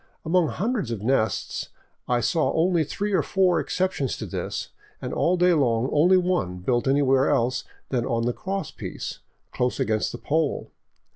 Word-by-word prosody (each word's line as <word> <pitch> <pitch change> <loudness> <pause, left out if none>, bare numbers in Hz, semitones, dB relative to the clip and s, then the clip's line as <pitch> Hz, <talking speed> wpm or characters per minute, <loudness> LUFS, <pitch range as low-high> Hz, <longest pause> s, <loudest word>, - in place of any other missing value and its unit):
Among 170 +1 +3
hundreds 210 - -1
of 110 -3 -4
nests 110 -4 0 0.4
I 120 -1 +1
saw 165 +6 +1
only 170 0 +2
three 205 +7 -3
or - - +4
four 185 -3 +2
exceptions 180 -8 -1
to - - -5
this, - - -4 0.3
and - - -5
all 180 +2 +2
day 180 0 +4
long 125 -5 +2
only 175 +5 +5
one 175 - 0
built 120 +8 0
any 140 +2 +3
where 135 0 +3
else 130 -2 +1 0.2
than 125 -3 0
on 115 0 0
the 120 - +1
cross 195 - -4
piece, - - -6 0.3
close 125 +2 -1
against 110 -5 0
the - - -6
pole. 155 0 -1
145 Hz, 170 wpm, -25 LUFS, 120-180 Hz, 0.4 s, only